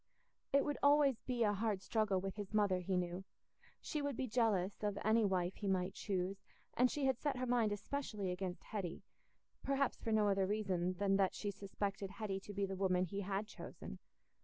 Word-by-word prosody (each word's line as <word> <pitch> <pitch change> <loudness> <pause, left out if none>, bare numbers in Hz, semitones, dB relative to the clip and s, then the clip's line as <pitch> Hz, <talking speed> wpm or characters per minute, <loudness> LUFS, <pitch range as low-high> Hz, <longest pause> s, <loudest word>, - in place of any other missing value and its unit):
It 280 0 +4
would 290 -1 -1
always 285 -3 +5
be 245 -2 +1
a 205 -1 +3
hard 205 -2 -1
struggle 215 -4 +1
with 195 0 -4
his 205 0 -5
mother, 200 -3 +3
he 185 +1 0
knew: 180 +1 -2 0.6
she 300 - -3
would 285 -4 -2
be 265 - 0
jealous 215 -5 +1
of 205 -1 -1
any 220 +1 +5
wife 185 -2 +1
he 205 - -3
might 190 -1 +1
choose, 190 0 -2 0.3
and 250 +1 +4
she 285 +1 -1
had 260 -2 +2
set 290 -3 0
her 255 - -1
mind 240 -3 +2
especially 205 -2 -2
against 180 0 -4
Hetty—perhaps 230 +7 -4
for 225 - -2
no 215 -1 +4
other 195 -1 +2
reason 185 -4 0
than 195 +1 +2
that 195 -1 +2
she 205 - -2
suspected 200 0 -3
Hetty 200 0 -3
to 200 - -9
be 200 0 0
the 195 0 -4
woman 185 -1 +2
he 200 +3 -4
had 200 +1 -1
chosen. - - -9
200 Hz, 195 wpm, -38 LUFS, 190-225 Hz, 0.6 s, always